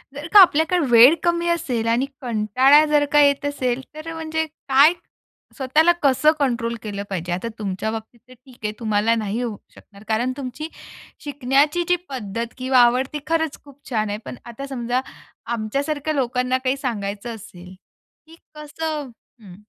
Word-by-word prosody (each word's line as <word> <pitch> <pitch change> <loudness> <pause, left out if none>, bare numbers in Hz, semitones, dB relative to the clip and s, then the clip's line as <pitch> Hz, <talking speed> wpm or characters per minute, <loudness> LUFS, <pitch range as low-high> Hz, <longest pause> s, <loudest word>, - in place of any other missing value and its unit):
जर 290 +3 -6
का 415 - +10
आपल्याकडे 350 0 +4
वेळ 240 +6 +8
कमी 345 0 +1
असेल 250 -9 -1
आणि 240 +4 +2 0.2
कंटाळा 255 +5 +4
जर 295 -1 +2
का 295 - +5
येत 280 0 +3
असेल, 265 -3 -1
तर 310 +2 -7
म्हणजे 320 0 -2
काय 295 0 +3 0.6
स्वतःला 300 +5 +3
कसं 285 +3 +4
कंट्रोल 235 -4 -1
केलं 200 -2 -5
पाहिजे? 180 -2 -4
आता 185 +6 -3
तुमच्या 205 +1 -3
बाबतीत 225 +2 -8
तर 255 - -15
ठीक 255 0 -19
आहे, 210 - -1
तुम्हाला 220 0 +1
नाही 220 +1 -3
होऊ 230 -4 -4 0.2
शकणार, 200 0 -17
कारण 235 +4 0
तुमची 275 +3 -6 0.6
शिकण्याची 285 +4 +1
जी 355 - +5
पद्धत 230 -2 -5
किंवा 260 0 +2
आवड 245 +2 +4
ती 300 - -3
खरंच 320 -2 -1
खूप 285 -1 -17
छान 215 -4 -1
आहे. 205 - -3
पण - - -7
आता 240 +4 -8
समजा 245 -1 -2 0.5
आमच्यासारख्या 280 +7 -2
लोकांना 255 -2 0
काही 260 +1 0
सांगायचं 225 -3 -4
असेल 185 -4 -13 0.5
की 325 - -15 0.2
कसं 300 -1 -5 0.3
हं. 185 -4 -13
255 Hz, 160 wpm, -21 LUFS, 225-295 Hz, 0.6 s, का